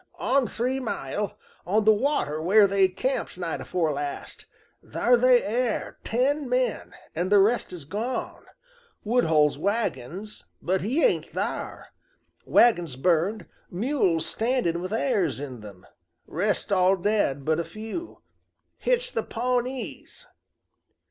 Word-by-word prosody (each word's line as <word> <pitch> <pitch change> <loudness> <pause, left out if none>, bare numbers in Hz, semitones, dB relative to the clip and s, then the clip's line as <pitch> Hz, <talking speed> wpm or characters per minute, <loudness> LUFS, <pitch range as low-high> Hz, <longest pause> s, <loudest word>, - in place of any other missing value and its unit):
"On 270 -2 +1
three 255 +3 -2
mile, 210 - -4 0.3
on 210 +4 +1
the 220 - +7
water 210 - 0
where 200 +5 +5
they 195 -1 +3
camped 195 +4 -3
night 175 -3 -3
afore 165 -4 -1
last. 145 0 -6 0.4
Thar 245 - +2
they 250 0 +4
air 235 +1 -2
ten 270 +4 0
men, 250 0 -1 0.2
an' 175 +3 -2
the 205 - +5
rest's 195 -5 +1
gone. 255 - -4 0.6
Woodhull's 160 - +2
wagons, 200 - -3
but 185 +2 0
he 255 - 0
ain't - - +1
thar. - - -4 0.6
Wagons 175 - +4
burned, 175 - +1 0.2
mules 190 - 0
standing 225 -8 0
with 185 +2 -5
arrers 210 - 0
in 130 -5 -7
them, 100 -3 -12 0.4
rest 205 +5 -1
all 190 0 +4
dead 185 -8 0
but 160 +1 +1
a - - 0
few. 220 - -8 0.6
Hit's - - +1
the - - -1
Pawnees!" 250 +2 -3
205 Hz, 125 wpm, -26 LUFS, 170-245 Hz, 0.6 s, the